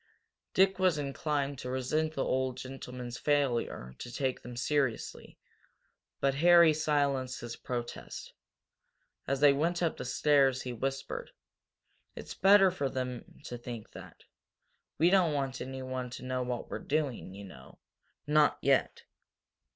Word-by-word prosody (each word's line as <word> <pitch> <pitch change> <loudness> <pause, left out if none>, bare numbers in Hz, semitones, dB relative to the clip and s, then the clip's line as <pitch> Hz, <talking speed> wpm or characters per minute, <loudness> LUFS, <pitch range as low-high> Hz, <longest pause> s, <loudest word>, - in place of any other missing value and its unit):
Dick 190 0 +4
was 185 -4 +3
inclined 140 -1 -2
to 125 - -5
resent 150 +5 -1
the 135 - 0
old 130 -1 0
gentleman's 125 -2 -7
failure 125 - 0
to 120 - -7
take 130 +1 -2
them 120 -1 -9
seriously, 135 -2 -1 0.8
but 135 0 +2
Harry 170 +2 +6
silenced 140 -4 0
his 120 0 -6
protest. 120 -1 -6 0.9
As 135 0 -1
they 145 -1 +7
went 170 +5 0
up 165 - 0
the - - -5
stairs 135 0 +3
he 125 - -4
whispered: 135 +3 -4 0.9
"It's - - -7
better 195 -1 +6
for 140 -6 -2
him 125 0 -5
to 120 -4 -7
think 120 -2 -8
that. - - -12 0.7
We 170 +3 +4
don't 180 -6 +4
want 135 -2 -2
anyone 130 -1 -4
to - - -10
know 130 0 -2
what 125 -1 -4
we're - - -3
doing, 140 -10 -2
you 100 - -9
know 65 -9 -13 0.5
not 150 0 +4
yet." 135 -1 +1
135 Hz, 140 wpm, -31 LUFS, 125-150 Hz, 0.9 s, they